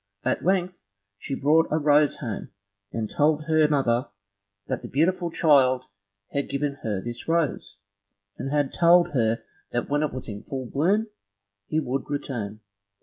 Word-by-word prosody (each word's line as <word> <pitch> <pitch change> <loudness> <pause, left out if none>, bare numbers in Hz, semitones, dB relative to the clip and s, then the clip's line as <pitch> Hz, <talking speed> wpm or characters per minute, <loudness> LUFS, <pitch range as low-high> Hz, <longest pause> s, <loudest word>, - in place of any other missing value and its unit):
At - - 0
length 180 - 0 0.3
she 135 - -4
brought 155 +4 +3
a 155 - +1
rose 150 -1 +4
home, 115 -7 -5 0.4
and 110 -1 -2
told 150 +5 +2
her 155 -1 +4
mother 130 -4 +1 0.6
that - - -3
the - - -7
beautiful 170 +4 +1
child 135 -6 +4 0.5
had 140 0 -2
given 140 0 -2
her 105 -4 -2
this 120 +3 -6
rose, 165 -10 0 0.6
and 135 - -5
had 145 -1 0
told 175 +1 +5
her 115 -4 +1 0.3
that 120 +3 -2
when 145 +1 +2
it 155 - 0
was 130 0 -7
in 105 -2 -6
full 130 +1 -5
bloom, 180 - +1 0.6
he 155 - 0
would 135 -1 -3
return. 115 -7 -4
145 Hz, 155 wpm, -25 LUFS, 125-155 Hz, 0.6 s, told